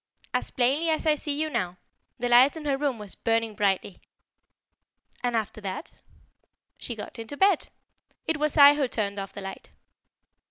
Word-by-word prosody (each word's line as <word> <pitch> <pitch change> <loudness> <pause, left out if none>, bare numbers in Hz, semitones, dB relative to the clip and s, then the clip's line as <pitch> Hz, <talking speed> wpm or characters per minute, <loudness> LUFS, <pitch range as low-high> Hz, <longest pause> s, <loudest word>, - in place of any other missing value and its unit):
"As - - -1
plainly 275 +6 +1
as 315 0 0
I 310 - +5
see 295 -1 -2
you 315 - 0
now. 185 - -2 0.4
The 245 - -1
light 250 +6 +6
in 310 - -8
her 280 -2 +1
room 275 -3 -1
was 210 -2 -6
burning 225 -1 0
brightly." 200 -2 -1 1.2
"And 245 -1 0
after 220 -1 -2
that?" 195 - -5 0.9
"She 235 - -3
got 215 - -8
into 230 +6 -7
bed. 385 -2 +3 0.6
It 320 - 0
was 300 +1 0
I 285 0 +10
who 290 -2 0
turned 205 -4 -2
off 195 0 -6
the 200 - -7
light." 195 0 -8
245 Hz, 170 wpm, -26 LUFS, 210-295 Hz, 1.2 s, I